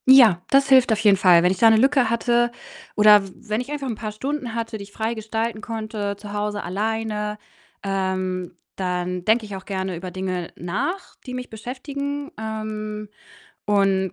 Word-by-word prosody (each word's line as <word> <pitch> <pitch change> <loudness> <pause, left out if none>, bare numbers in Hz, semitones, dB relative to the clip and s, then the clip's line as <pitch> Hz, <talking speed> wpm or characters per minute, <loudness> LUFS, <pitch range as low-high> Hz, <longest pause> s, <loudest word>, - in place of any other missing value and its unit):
Ja, 240 -9 +8
das 275 0 +4
hilft 260 -3 +6
auf 215 - +2
jeden 210 -2 +5
Fall. 180 -2 +6
Wenn 180 - +4
ich 190 - -3
da 230 - +7
'ne 220 - +5
Lücke 265 0 +4
hatte 240 +1 +2 0.4
oder 210 -1 +7
w - - -13 0.2
wenn 215 +3 0
ich 260 +3 -8
einfach 285 -2 -3
'n 235 - -2
paar 215 0 -5
Stunden 260 +1 -4
hatte, 230 -1 -3
die - - -6
ich 200 - -14
frei 220 +2 -2
gestalten 220 0 -3
konnte, 215 -2 -4
zu 205 0 -9
Hause 210 0 -2
alleine, 210 +2 -2 0.5
ähm, 185 -2 -2 0.2
dann 180 -1 -2
denke 220 +1 +3
ich 205 -2 -7
auch 190 0 -9
gerne 190 -2 -3
über 180 +2 -6
Dinge 185 -1 -4
nach, 265 - -3
die 250 - -5
mich 250 0 -6
beschäftigen. 280 +5 -5
Ähm, 215 -1 -5 0.6
und 195 -2 +2
215 Hz, 185 wpm, -23 LUFS, 190-235 Hz, 0.6 s, Ja